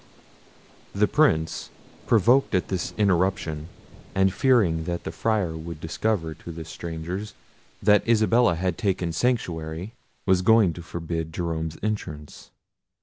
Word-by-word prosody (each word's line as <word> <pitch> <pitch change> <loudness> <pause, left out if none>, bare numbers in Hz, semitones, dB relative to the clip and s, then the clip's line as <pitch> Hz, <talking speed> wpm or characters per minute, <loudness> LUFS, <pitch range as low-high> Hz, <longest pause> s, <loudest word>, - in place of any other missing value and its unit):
The 105 +1 +3
Prince, 90 - +1 0.4
provoked 115 +3 +4
at 90 - 0
this 95 -2 -2
interruption, 90 -5 +1 0.5
and 95 0 +3
fearing 100 - +3
that 85 0 -3
the - - -4
Friar 105 -8 0
would 80 0 -7
discover 80 +1 -1
to 85 - -10
the 80 0 -7
strangers 85 +5 -6 0.5
that 105 +3 +4
Isabella 115 -3 +4
had 90 0 -2
taken 90 -5 0
sanctuary, 90 -5 -2 0.3
was 95 -1 +3
going 110 -3 +5
to 85 - -8
forbid 80 -1 -4
Jerome's 80 -2 -3
entrance. 75 -9 -5
90 Hz, 125 wpm, -25 LUFS, 80-105 Hz, 0.5 s, going